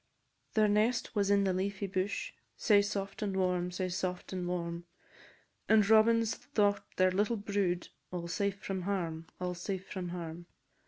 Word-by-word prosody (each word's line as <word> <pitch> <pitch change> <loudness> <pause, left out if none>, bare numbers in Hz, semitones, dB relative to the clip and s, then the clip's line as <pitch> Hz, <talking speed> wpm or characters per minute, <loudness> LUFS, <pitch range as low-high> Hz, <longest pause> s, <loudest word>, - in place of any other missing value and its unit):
"_ - - -38
Their 215 -1 +5
nest 215 +3 +2
was 200 -1 +2
in 200 0 +4
the 190 -1 +2
leafy 195 +2 -2
bush, 195 - -2 0.2
Sae 205 -2 +5
soft 200 0 -3
and 200 -2 -1
warm, 180 -1 +1
sae 185 +1 -2
soft 180 +1 -3
and 180 -1 -2
warm, 170 -1 -3 0.8
And 215 -2 +6
Robins 225 +1 +5
thought 205 -6 +1
their 185 0 +4
little 205 +5 +1
brood 200 -4 -1 0.2
All 175 -1 -4
safe 200 +3 -1
from 190 -1 -2
harm, 170 -4 -2
all 180 0 -2
safe 190 +2 -4
from 180 -2 -4
harm. 170 -1 -6
190 Hz, 165 wpm, -32 LUFS, 180-205 Hz, 0.8 s, And